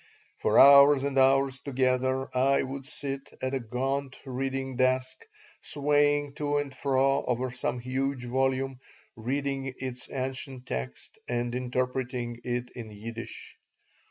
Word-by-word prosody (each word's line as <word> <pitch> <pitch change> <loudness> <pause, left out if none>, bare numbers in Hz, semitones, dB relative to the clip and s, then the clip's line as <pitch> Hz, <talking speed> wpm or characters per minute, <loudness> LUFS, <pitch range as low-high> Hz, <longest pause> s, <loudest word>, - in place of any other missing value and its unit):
For - - +2
hours 140 0 +8
and 140 -1 -1
hours 135 0 +4
together 130 -1 0
I 135 +2 +3
would 135 0 -6
sit 140 -2 -6
at 130 +1 -2
a 135 - 0
gaunt 130 +3 -2
reading 135 0 -3
desk, 130 - 0 0.3
swaying 145 0 +1
to 145 -1 0
and 145 -2 -2
fro 135 0 +2
over 125 +1 -1
some 125 0 -2
huge 130 +1 -2
volume, 130 +1 0 0.4
reading 135 +2 -2
its 130 -1 -6
ancient 130 0 -4
text 65 0 -6
and 120 0 -1
interpreting 125 -1 -2
it 125 0 -3
in 115 -3 -8
Yiddish. 115 +2 -8
130 Hz, 130 wpm, -28 LUFS, 125-135 Hz, 0.4 s, hours